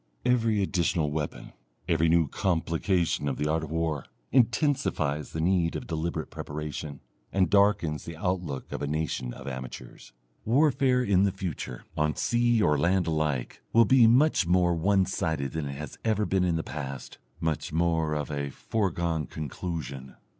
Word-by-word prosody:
Every 115 -4 +2
additional 85 -5 0
weapon, 75 -1 -4 0.3
every 80 0 +3
new 85 -1 +4
complication 85 -1 0
of 70 - -1
the 75 - -1
art 80 +1 0
of 80 - -6
war, 80 -3 -1 0.3
intensifies 120 - +1
the 80 - -4
need 85 -1 +2
of - - -4
deliberate 80 -1 -3
preparation, 75 -1 -6 0.3
and 95 -3 +2
darkens 100 -7 +3
the 85 -1 -7
outlook 90 -6 -3
of - - -4
a 70 - -1
nation 75 -4 -2
of 65 - -10
amateurs. 65 -2 -8 0.3
Warfare 130 0 +3
in 100 -5 +3
the 100 0 +3
future, 85 -10 -5
on 75 0 +1
sea 120 -2 +2
or 75 -5 +3
land 90 +3 +2
alike, 75 -6 -1
will 115 0 +7
be 125 +1 +6
much 125 - +4
more 90 0 +3
one 95 +3 +2
sided 80 -7 -2
than 80 -3 -3
it 70 - -4
has 75 -2 -8
ever 110 -2 +1
been 95 -2 +1
in 85 -2 +1
the 80 - -1
past, 70 -3 -7 0.2
much 80 -2 -2
more 80 -1 +1
of 75 0 -3
a 70 -1 -2
foregone 85 -2 -1
conclusion. 70 -3 -6
80 Hz, 160 wpm, -28 LUFS, 75-95 Hz, 0.3 s, will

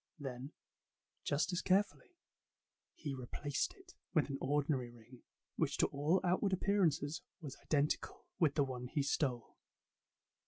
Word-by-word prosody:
Then, 135 -1 -5 0.7
just 150 +5 +1
as 175 - +1
carefully, 205 - +1 0.8
he 145 -3 -4
replaced 135 - -2
it 375 -2 -16 0.2
with 155 -2 +4
an 135 - -3
ordinary 140 -2 +1
ring, 120 +1 -15 0.4
which - - +1
to - - +5
all 150 +6 +2
outward 190 +2 +2
appearances 175 -5 +2 0.2
was 145 -5 -7
identical 150 -1 0
with 155 -5 +4
the 145 - +4
one 125 -2 -4
he 145 +2 0
stole. 130 -4 0
145 Hz, 130 wpm, -37 LUFS, 135-175 Hz, 0.8 s, to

